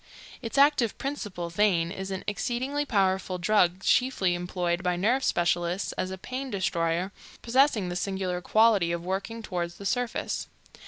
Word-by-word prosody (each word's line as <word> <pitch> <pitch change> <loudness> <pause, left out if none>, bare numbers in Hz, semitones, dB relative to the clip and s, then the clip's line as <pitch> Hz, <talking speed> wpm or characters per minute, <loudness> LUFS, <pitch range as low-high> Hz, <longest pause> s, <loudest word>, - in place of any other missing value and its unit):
Its 230 +2 -5
active 280 -5 +4
principle, 205 -11 -4
theine, 175 -3 +2
is 190 0 -5
an 190 -1 -4
exceedingly 255 +7 -2
powerful 190 -4 +1
drug, 185 0 +2
chiefly 250 -8 +2
employed 175 0 -2
by 180 -1 0
nerve 235 +9 +1
specialists 175 +2 0
as 185 - -3
a 190 - -5
pain 260 +7 -5
destroyer, 175 -2 -1 0.3
possessing 240 -5 +3
the 175 - -4
singular 190 -1 -2
quality 215 -4 +4
of 170 0 -3
working 200 +5 -3
toward 175 -4 -2
the 200 +3 -11
surface. 245 +3 -2
190 Hz, 150 wpm, -27 LUFS, 175-230 Hz, 0.3 s, active